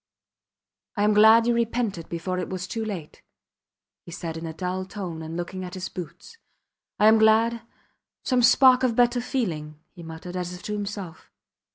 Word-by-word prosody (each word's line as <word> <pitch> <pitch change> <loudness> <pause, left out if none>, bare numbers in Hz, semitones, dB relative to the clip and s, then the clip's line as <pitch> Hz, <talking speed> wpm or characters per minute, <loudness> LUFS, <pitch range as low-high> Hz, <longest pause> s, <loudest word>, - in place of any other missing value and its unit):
I 205 - +1
am 210 0 +3
glad 220 +2 +7
you 240 - +2
repented 230 -6 -2
before 180 +2 -3
it 180 - -4
was 185 -1 -4
too 225 +3 -4
late, 190 -8 -7 0.8
he 170 - -12
said 165 -1 -6
in 165 0 -6
a 160 - -6
dull 185 +2 -3
tone 185 -4 -7
and 160 +1 -6
looking 185 +2 -5
at 180 +1 -7
his 185 0 -5
boots. 180 - -10 0.6
I 210 - +3
am 220 +1 +6
glad... 225 +1 +3 0.6
some 255 -2 +1
spark 255 +1 +6
of 250 -3 +1
better 245 0 +3
feeling, 160 - -3
he 175 - -12
muttered, 165 +2 -9
as 180 0 -4
if 180 - -13
to 210 - -4
himself. 200 -4 -6
190 Hz, 180 wpm, -25 LUFS, 175-225 Hz, 0.8 s, glad